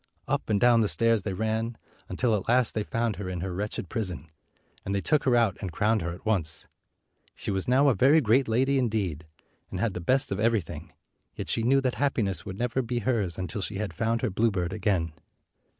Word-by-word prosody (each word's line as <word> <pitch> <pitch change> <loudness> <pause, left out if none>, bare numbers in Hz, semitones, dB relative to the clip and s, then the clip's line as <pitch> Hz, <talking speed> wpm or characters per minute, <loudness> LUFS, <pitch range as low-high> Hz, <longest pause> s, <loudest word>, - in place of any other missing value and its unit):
Up - - -1
and 105 -2 +2
down 120 0 +5
the 105 - +2
stairs 115 0 +2
they 95 0 -3
ran, 110 +3 -2 0.3
until 110 +5 +1
at 95 - -3
last 125 0 +3
they 110 - -1
found 115 +1 -1
220 100 - -7
her 90 - -4
in 90 -2 -4
her 95 0 -3
wretched 100 0 -3
prison, 90 - -4 0.5
and 100 - -2
they - - +1
took 150 +9 +1
her 125 -2 +4
out 115 -6 +2
and 95 -4 -4
crowned 105 +5 +1
her 85 +1 -3
at 90 +6 -10
once. 95 -8 +1 0.7
She - - -4
was 95 -1 -2
now 135 +3 +4
a 135 - +5
very 135 +9 +5
great 130 +1 +3
lady, 135 +5 +2
indeed, 100 - -1 0.4
and 90 - -5
had 110 -1 0
the 90 - -5
best 130 +9 +1
of 100 - -2
every 115 -1 +3
thing, 80 - -9 0.4
yet - - -4
she - - +1
knew 135 +4 +3
that 130 -2 0
happiness 110 -9 0
would 95 -1 -6
never 125 +2 0
be 120 0 -3
hers 105 -7 -1
until 95 +3 -4
she 100 - -4
had 100 -3 -3
found 115 +7 -1
her 125 - +1
bluebird 95 -4 0
again. 95 -7 0
110 Hz, 225 wpm, -27 LUFS, 95-120 Hz, 0.7 s, down